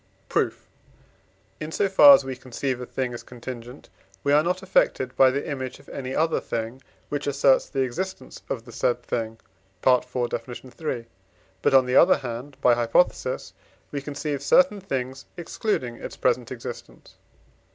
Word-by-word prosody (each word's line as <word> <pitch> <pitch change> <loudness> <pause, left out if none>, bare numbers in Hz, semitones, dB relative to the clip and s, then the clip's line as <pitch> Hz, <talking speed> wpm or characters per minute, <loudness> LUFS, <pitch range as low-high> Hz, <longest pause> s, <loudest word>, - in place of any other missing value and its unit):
Proof. - - -1 0.9
In 155 +1 -5
so 200 - +1
far 275 +9 +9
as - - -1
we 130 -1 -4
conceive 130 0 -4
a 125 - -6
thing 130 -2 -3
as 120 - -6
contingent, 125 +1 -9 0.4
we 140 - +2
are 150 - +6
not 180 +3 -1
affected 130 -8 +1
by 130 - +6
the 140 +2 -2
image 130 -3 -4
of - - -20
any 130 -1 -5
other 160 +1 +2
thing, 115 +3 -4 0.3
which 145 0 -3
asserts 140 -1 +3
the 135 - -1
existence 185 +10 -5
of 115 -3 -4
the 120 - -11
said 120 +1 0
thing 115 -2 -3 0.5
(IV. 125 -1 +4 0.2
Def. 120 +2 -6 0.2
iii.), 125 -7 -3 0.6
but, - - +3
on 130 -1 +6
the 125 +1 +2
other 185 - +7
hand 125 +3 -7
(by 125 - +5
hypothesis), 120 - +1 0.4
we 140 - -3
conceive 145 0 -4
certain 210 - +4
things 135 -6 -4
excluding 165 - -2
its - - -8
present - - 0
existence. - - -9
130 Hz, 160 wpm, -25 LUFS, 125-150 Hz, 0.9 s, far